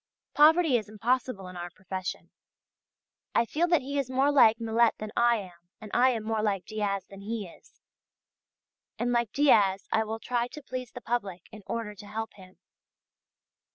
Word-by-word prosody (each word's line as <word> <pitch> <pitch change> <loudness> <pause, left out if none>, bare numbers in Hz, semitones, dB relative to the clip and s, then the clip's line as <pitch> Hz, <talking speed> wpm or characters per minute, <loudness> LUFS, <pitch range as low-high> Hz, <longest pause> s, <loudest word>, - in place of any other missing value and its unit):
Poverty 310 -2 +5
is 215 -3 -6
impossible 220 -2 -1
in 180 - -10
our 175 0 -5
profession. 185 +1 -6 1.0
I 230 - +4
feel 325 +8 0
that 340 -5 +3
he 280 +2 -2
is 270 -3 -2
more 265 +2 +2
like 230 -5 +6
Millet 230 +1 +2
than 215 0 -6
I 235 0 +4
am, 175 -5 -9
but 215 - -10
I 255 +2 +5
am 230 -4 -2
more 220 0 -1
like 200 -3 -1
Diaz 205 -3 -2
than 195 0 -12
he 215 -1 -4
is. 170 - -19 1.2
And 245 0 -1
like 235 -3 +1
Diaz 205 -10 +3
I 220 - +2
will 220 +1 -4
try 240 +1 -1
to 300 +3 -11
please 255 -2 -6
the 245 - -9
public 200 -8 -3
in 215 - -11
order 225 -2 -3
to 205 0 -12
help 220 +2 -5
him. 185 -2 -16
225 Hz, 180 wpm, -28 LUFS, 200-250 Hz, 1.2 s, like